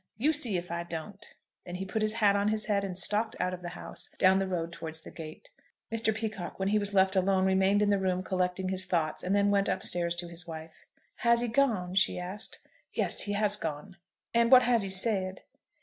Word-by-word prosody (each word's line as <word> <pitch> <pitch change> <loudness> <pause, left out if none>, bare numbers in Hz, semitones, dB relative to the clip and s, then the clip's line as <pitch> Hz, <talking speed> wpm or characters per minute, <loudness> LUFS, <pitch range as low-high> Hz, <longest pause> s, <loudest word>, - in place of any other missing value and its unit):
You 295 +8 +1
see 245 -10 +4
if 175 0 -7
I 170 0 -3
don't." 170 +4 -8 0.4
Then 175 - -8
he 190 +1 -5
put 215 +3 -3
his 215 0 +1
hat 210 -3 +2
on 200 0 0
his 215 0 -1
head, 200 -2 0
and 185 -2 -5
stalked 215 +3 -1
out 185 - -1
of 180 - -7
the 175 - -6
house, 175 - -9
down 190 +1 +4
the 195 - -2
road 170 -2 -4
towards 160 -1 -6
the - - -12
gate. 155 -2 -11 0.4
Mr. 225 -1 +1
Peacocke, 215 -4 -5
when 190 0 -1
he 210 +1 +2
was 205 0 -3
left 190 0 +3
alone, 190 0 +2
remained 190 +2 +2
in 205 - +1
the 200 -1 +2
room 185 -1 -1
collecting 185 0 -2
his 185 -1 +1
thoughts, 165 -4 -1
and 185 +2 -1
then 205 0 +2
went 200 0 +1
up 190 - -2
stairs 170 -1 0
to 175 0 -4
his 170 +1 +1
wife. 160 0 -10 0.3
"Has 235 0 +2
he 245 - -1
gone?" 220 -8 0
she 195 0 +2
asked. 185 +4 -3 0.3
"Yes, - - +3
he 205 - -1
has 205 0 +4
gone." 160 -1 -6 0.4
"And 235 +1 +2
what 255 -1 +8
has 240 -2 +3
he 195 - +1
said?" 190 -1 +4
190 Hz, 230 wpm, -29 LUFS, 180-210 Hz, 0.4 s, what